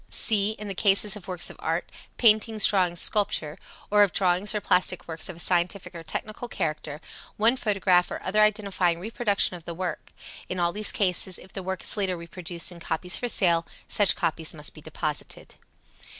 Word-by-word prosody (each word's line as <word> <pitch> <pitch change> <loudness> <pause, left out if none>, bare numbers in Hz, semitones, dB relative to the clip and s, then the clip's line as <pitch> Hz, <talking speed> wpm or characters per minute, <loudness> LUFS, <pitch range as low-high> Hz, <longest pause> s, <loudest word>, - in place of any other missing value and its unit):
(c) 215 -1 +3
In 210 -1 -8
the 200 - -3
case 200 +1 +3
of 210 - -10
works 180 -2 -3
of - - -15
art - - -2 0.3
(paintings, 220 -1 +4
drawings, 180 -4 +3
sculpture), 200 -9 0 0.3
or 210 0 +6
of 200 -3 +5
drawings 190 +3 +1
or - - +1
plastic 180 -2 +1
works 160 0 -6
of 180 - -7
a - - -12
scientific 180 +2 -1
or 170 - -8
technical 215 +8 -5
character, 155 -6 -4 0.4
one 225 +4 +4
photograph 195 -6 +2
or - - -5
other 210 +3 +2
identifying 200 -5 +2
reproduction 205 -1 +1
of 170 -2 -12
the 170 - -6
work. 180 0 -5 0.4
In 185 - -3
all 170 0 +2
these 210 +3 -1
cases, 185 -2 +1
if 185 - -15
the 195 - -5
work 190 0 -4
is - - 0
later 190 -3 0
reproduced 170 +1 -2
in 175 - -11
copies 170 +2 -2
for 245 - -2
sale, 170 -7 +2 0.2
such 205 -4 +3
copies 160 0 -1
must 150 -1 -4
be 155 - -13
deposited. 155 -1 -5
185 Hz, 190 wpm, -26 LUFS, 170-210 Hz, 0.4 s, or